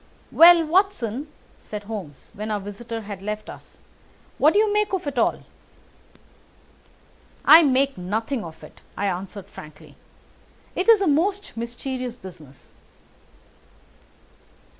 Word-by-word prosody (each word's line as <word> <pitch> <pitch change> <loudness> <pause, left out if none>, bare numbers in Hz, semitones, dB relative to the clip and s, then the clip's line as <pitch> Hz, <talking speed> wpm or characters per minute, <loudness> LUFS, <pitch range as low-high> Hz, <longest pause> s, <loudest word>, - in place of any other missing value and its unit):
"Well, 335 0 +7
Watson," 310 - 0 0.3
said 210 -1 -8
Holmes 200 -9 -9
when 215 0 -6
our 210 -1 -1
visitor 225 +3 -7
had 200 -2 -8
left 210 +1 -5
us, - - -15 0.6
"what 305 +3 +5
do - - +2
you 425 -1 +3
make 420 -1 0
of 380 - -2
it 285 - -2
all?" - - 0 2.0
"I 325 - +9
make 275 - +1
nothing 220 +7 -3
of 160 -1 -11
it," - - -15 0.2
I 205 - -1
answered 195 +1 -4
frankly. 155 0 -14 0.8
"It 375 - 0
is 445 -3 +7
a 390 - +1
most 380 +7 0
mysterious 245 +1 -5
business." 170 - -14
230 Hz, 125 wpm, -23 LUFS, 200-320 Hz, 2.0 s, I